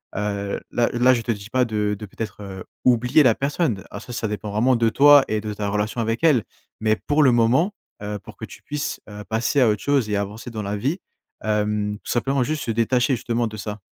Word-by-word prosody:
heu, 100 Hz, 0 st, -2 dB
là 120 Hz, -1 st, +2 dB
là 125 Hz, +2 st, +5 dB
je 120 Hz, -, 0 dB
te 115 Hz, -, -2 dB
dis 100 Hz, +1 st, -10 dB
pas 130 Hz, 0 st, +2 dB
de 105 Hz, -2 st, -1 dB
de 105 Hz, -, -6 dB
peut-être 100 Hz, -2 st, -7 dB, 0.2 s
oublier 125 Hz, +4 st, +4 dB
la 115 Hz, -4 st, +4 dB
personne. 140 Hz, -, -1 dB
Ah, -, -, -6 dB
ça 125 Hz, -, -9 dB
ça 115 Hz, -, -2 dB
dépend 105 Hz, 0 st, -4 dB
vraiment 120 Hz, +5 st, +3 dB
de 115 Hz, -1 st, +2 dB
toi 145 Hz, +3 st, +7 dB
et 110 Hz, 0 st, -1 dB
de 105 Hz, 0 st, -4 dB
ta 105 Hz, 0 st, -3 dB
relation 105 Hz, +3 st, -2 dB
avec 115 Hz, +5 st, -1 dB
elle. 140 Hz, -9 st, +4 dB, 0.4 s
Mais, 110 Hz, 0 st, +2 dB
pour 145 Hz, +7 st, 0 dB
le 130 Hz, -, +6 dB
moment, 125 Hz, -, +3 dB, 0.3 s
heu, 105 Hz, 0 st, -4 dB
pour 100 Hz, -, -13 dB
que -, -, -6 dB
tu -, -, -14 dB
puisses 150 Hz, 0 st, -4 dB, 0.3 s
passer 115 Hz, +6 st, +1 dB
à 125 Hz, -, +5 dB
autre 105 Hz, -1 st, +1 dB
chose 140 Hz, -6 st, +1 dB
et 105 Hz, -, 0 dB
avancer 100 Hz, +3 st, -4 dB
dans 110 Hz, -2 st, -5 dB
la 100 Hz, +1 st, -3 dB
vie, 140 Hz, -, -1 dB, 0.4 s
hem, 105 Hz, -1 st, 0 dB
simplement, 135 Hz, +2 st, 0 dB
juste 150 Hz, +3 st, -2 dB
se 115 Hz, -, -2 dB
détacher, 125 Hz, +4 st, +2 dB
justement, 120 Hz, 0 st, -1 dB
de 110 Hz, -, -8 dB
ça. 105 Hz, 0 st, -5 dB
115 Hz, 225 wpm, -22 LUFS, 105-130 Hz, 0.4 s, toi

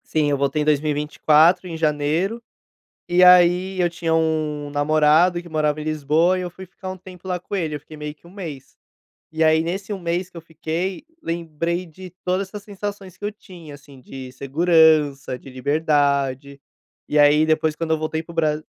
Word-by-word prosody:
Sim, 155 Hz, -2 st, 0 dB
eu 145 Hz, -, +1 dB
voltei 140 Hz, +2 st, 0 dB
em -, -, -1 dB
2024 150 Hz, +3 st, +3 dB
em 165 Hz, -2 st, -6 dB
janeiro, 160 Hz, +8 st, 0 dB, 0.7 s
e 180 Hz, +1 st, +5 dB
aí, 180 Hz, +1 st, +5 dB
eu 175 Hz, -1 st, +2 dB
tinha 165 Hz, -1 st, -2 dB
um 155 Hz, -2 st, -1 dB
namorado 155 Hz, +4 st, +3 dB
que 175 Hz, -, -13 dB
morava 155 Hz, -1 st, 0 dB
em -, -, -5 dB
Lisboa 155 Hz, +4 st, +1 dB
e -, -, -3 dB
eu 180 Hz, -, -5 dB
fui 190 Hz, +2 st, -11 dB
ficar 190 Hz, +1 st, -9 dB
um 185 Hz, -, -6 dB
tempo 185 Hz, 0 st, -14 dB
lá 180 Hz, -1 st, -2 dB
com 200 Hz, -, -5 dB
ele, 160 Hz, -5 st, -2 dB
eu 150 Hz, -, -5 dB
fiquei 155 Hz, +2 st, -13 dB
meio 150 Hz, 0 st, -6 dB
que 155 Hz, -, -42 dB
1 170 Hz, -, -15 dB
mês. 165 Hz, -9 st, -9 dB, 0.6 s
E 160 Hz, 0 st, 0 dB
aí 160 Hz, 0 st, +4 dB
nesse 195 Hz, +5 st, -4 dB
1 200 Hz, -, -3 dB
mês 175 Hz, +1 st, -2 dB
que -, -, -13 dB
eu -, -, -7 dB
fiquei, 165 Hz, +3 st, -4 dB, 0.2 s
lembrei 170 Hz, +1 st, -3 dB
de 180 Hz, +3 st, -12 dB
todas 185 Hz, +2 st, -1 dB
essas 210 Hz, +1 st, -8 dB
sensações 200 Hz, -2 st, -7 dB
que 205 Hz, -, -7 dB
eu 205 Hz, -, -2 dB
tinha 175 Hz, -7 st, -13 dB
assim 140 Hz, -1 st, -15 dB
de 130 Hz, 0 st, -9 dB
segurança, 150 Hz, -1 st, +2 dB
de -, -, -13 dB
liberdade, 140 Hz, 0 st, 0 dB, 0.5 s
e 150 Hz, -, +1 dB
aí 150 Hz, +1 st, +5 dB
depois 155 Hz, -1 st, +1 dB
quando 165 Hz, +1 st, -3 dB
eu 160 Hz, -, +3 dB
voltei 155 Hz, 0 st, -3 dB
para 165 Hz, -, -13 dB
o -, -, -14 dB
Bra 155 Hz, -1 st, 0 dB
160 Hz, 200 wpm, -22 LUFS, 150-180 Hz, 0.7 s, e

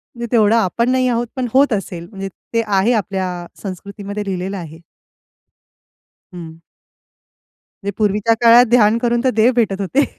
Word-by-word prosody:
म्हणजे 235 Hz, 0 st, -5 dB
तेवढं 220 Hz, -1 st, +4 dB
आपण 230 Hz, +3 st, +1 dB
नाही 255 Hz, 0 st, +1 dB
आहोत, 240 Hz, 0 st, -1 dB
पण 255 Hz, -2 st, -2 dB
होत 270 Hz, -2 st, +4 dB
असेल 175 Hz, -4 st, -5 dB
म्हणजे 195 Hz, -1 st, -6 dB, 0.2 s
ते 230 Hz, -, +2 dB
आहे 200 Hz, +4 st, +2 dB
आपल्या 190 Hz, -4 st, -3 dB, 0.2 s
संस्कृतीमध्ये 200 Hz, +2 st, -6 dB
लिहिलेलं 190 Hz, 0 st, -4 dB
आहे. 160 Hz, -2 st, -9 dB, 1.5 s
हं. 165 Hz, -2 st, -9 dB, 1.3 s
ते 200 Hz, -, -1 dB
पूर्वीच्या 210 Hz, +2 st, +1 dB
काळात 235 Hz, +1 st, +7 dB
ध्यान 225 Hz, -2 st, +4 dB
करून 240 Hz, 0 st, 0 dB
तर 260 Hz, -, +3 dB
देव 230 Hz, +4 st, +4 dB
भेटत 200 Hz, -4 st, 0 dB
होते. 265 Hz, +9 st, +1 dB
210 Hz, 145 wpm, -18 LUFS, 195-235 Hz, 1.5 s, काळात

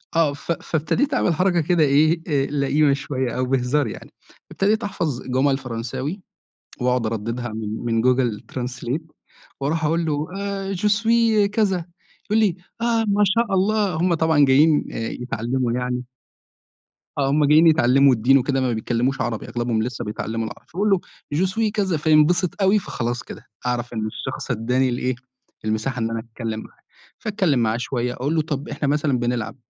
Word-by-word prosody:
آه، 155 Hz, -4 st, +3 dB
ف 145 Hz, -, -5 dB
فابتديت 165 Hz, -, -1 dB
أعمل 190 Hz, -8 st, +2 dB
حركة 175 Hz, +1 st, +2 dB
كده 170 Hz, 0 st, +2 dB
إيه، 155 Hz, +4 st, +3 dB
آآ 140 Hz, -3 st, +1 dB
لئيمة 145 Hz, 0 st, +2 dB
شوية 130 Hz, -3 st, -2 dB
أو 130 Hz, -, +1 dB
بهزار 130 Hz, +1 st, +1 dB
يعني، -, -, -9 dB, 0.4 s
ابتديت 210 Hz, +3 st, +1 dB
أحفَظ 155 Hz, -10 st, -2 dB
جُمل 135 Hz, +2 st, +1 dB
فرنساوي 130 Hz, -, -5 dB, 0.6 s
وأقعُد 125 Hz, -2 st, +1 dB
أردّدها 115 Hz, +2 st, -3 dB
من 110 Hz, -1 st, -4 dB, 0.2 s
من 115 Hz, -1 st, +1 dB
Google 125 Hz, -4 st, +2 dB
translate 125 Hz, +3 st, -3 dB, 0.6 s
وأرُوح 155 Hz, +3 st, 0 dB
أقول 165 Hz, +2 st, +1 dB
له 150 Hz, 0 st, -1 dB
آآ 195 Hz, -1 st, -3 dB
Je 200 Hz, +4 st, 0 dB
suis 230 Hz, -2 st, +3 dB
كذا، 195 Hz, -6 st, +1 dB, 0.4 s
يقول 215 Hz, +2 st, +2 dB
لي: 205 Hz, -6 st, +2 dB, 0.3 s
"آه، 230 Hz, -1 st, +2 dB
ما 205 Hz, 0 st, +3 dB
شاء 210 Hz, +2 st, +1 dB
الله." 200 Hz, 0 st, +2 dB
هُم 170 Hz, +2 st, +2 dB
طبعًا 160 Hz, -3 st, +4 dB
جايين 145 Hz, +3 st, +4 dB
آآ -, -, -6 dB
يتعلّموا 125 Hz, +1 st, -2 dB
يعني 125 Hz, +1 st, -2 dB, 1.1 s
آه، 135 Hz, -1 st, +1 dB
هُم 145 Hz, +1 st, +3 dB
جايين 155 Hz, +3 st, +6 dB
يتعلّموا 135 Hz, -3 st, +5 dB
الدِّين 125 Hz, +4 st, +4 dB
وكده 135 Hz, 0 st, 0 dB
ما 125 Hz, -2 st, +1 dB
بيتكلّموش 120 Hz, +4 st, -1 dB
عربي، 115 Hz, -3 st, -3 dB
أغلبهم 120 Hz, -2 st, -1 dB
لسه 120 Hz, -1 st, -4 dB
بيتعلّموا 110 Hz, +1 st, -3 dB
العر -, -, -11 dB
فباقول 200 Hz, +5 st, -1 dB
له 195 Hz, -2 st, +4 dB, 0.4 s
Je 185 Hz, +5 st, +2 dB
suis 220 Hz, +1 st, 0 dB
كذا، 195 Hz, -6 st, 0 dB
فينبسط 160 Hz, +5 st, +3 dB
أوي 195 Hz, +2 st, +4 dB
فخلاص 120 Hz, -, -3 dB
كده -, -, -11 dB, 0.2 s
أعرَف 120 Hz, -1 st, -2 dB
إن 110 Hz, -2 st, -2 dB
الشخص 130 Hz, +4 st, -5 dB
ادّاني 125 Hz, +3 st, +1 dB
الإيه، 125 Hz, +1 st, -1 dB, 0.5 s
المساحة 110 Hz, +4 st, -1 dB
إن 115 Hz, 0 st, -1 dB
أنا 115 Hz, -, -2 dB
أتكلّم 110 Hz, -1 st, -5 dB
معاه، -, -, -13 dB, 0.4 s
فأتكلّم 185 Hz, -, +1 dB
معاه 110 Hz, 0 st, +1 dB
شوية 125 Hz, 0 st, -2 dB
أقول 145 Hz, +6 st, -2 dB
له، 160 Hz, -, +3 dB
طَب 145 Hz, -2 st, -4 dB
إحنا 145 Hz, 0 st, -2 dB
مثلًا 145 Hz, -2 st, +1 dB
بنلعب، 120 Hz, -1 st, -2 dB
140 Hz, 170 wpm, -22 LUFS, 125-170 Hz, 1.1 s, جايين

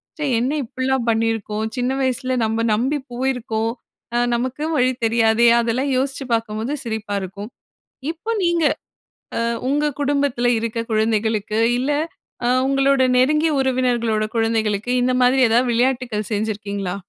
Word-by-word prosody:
ச்சே 305 Hz, -, -3 dB
என்ன 250 Hz, +4 st, 0 dB
இப்படிலாம் 260 Hz, 0 st, -2 dB
பண்ணியிருக்கோம் 220 Hz, -1 st, -1 dB
சின்ன 250 Hz, +1 st, 0 dB
வயசில 260 Hz, 0 st, 0 dB
நம்ம 225 Hz, +1 st, -1 dB
நம்பி 260 Hz, +7 st, +1 dB, 0.2 s
போயிருக்கோம். 240 Hz, -3 st, -1 dB, 0.4 s
அ -, -, +3 dB, 0.2 s
நமக்கு 255 Hz, +4 st, -2 dB
வழி 255 Hz, 0 st, +3 dB
தெரியாதே! 225 Hz, +1 st, +3 dB
அதெல்லாம் 240 Hz, +4 st, 0 dB
யோசிச்சு 270 Hz, +1 st, -2 dB
பார்க்கும்போது, 225 Hz, +3 st, -2 dB
சிரிப்பா 220 Hz, -3 st, -3 dB
இருக்கும். 200 Hz, +3 st, -7 dB, 0.6 s
இப்போ 340 Hz, +7 st, -5 dB
நீங்க 340 Hz, -1 st, +2 dB, 0.8 s
அ -, -, 0 dB, 0.3 s
உங்க 290 Hz, +2 st, +1 dB, 0.2 s
குடும்பத்தில 280 Hz, -4 st, +1 dB
இருக்க 230 Hz, 0 st, -3 dB
குழந்தைகளுக்கு 215 Hz, -1 st, 0 dB, 0.2 s
இல்ல, 260 Hz, +4 st, -1 dB, 0.6 s
அ -, -, +2 dB, 0.2 s
உங்களோட 275 Hz, 0 st, +3 dB
நெருங்கிய 300 Hz, +5 st, +3 dB
உறவினர்களோட 245 Hz, -4 st, +1 dB
குழந்தைகளுக்கு, 225 Hz, 0 st, 0 dB
இந்த 255 Hz, +1 st, +2 dB
மாதிரி 255 Hz, +2 st, +4 dB
ஏதாவது 240 Hz, +2 st, +3 dB
விளையாட்டுக்கள் 240 Hz, -3 st, 0 dB
செஞ்சிருக்கீங்களா? 205 Hz, -3 st, -2 dB
240 Hz, 125 wpm, -21 LUFS, 220-265 Hz, 0.8 s, மாதிரி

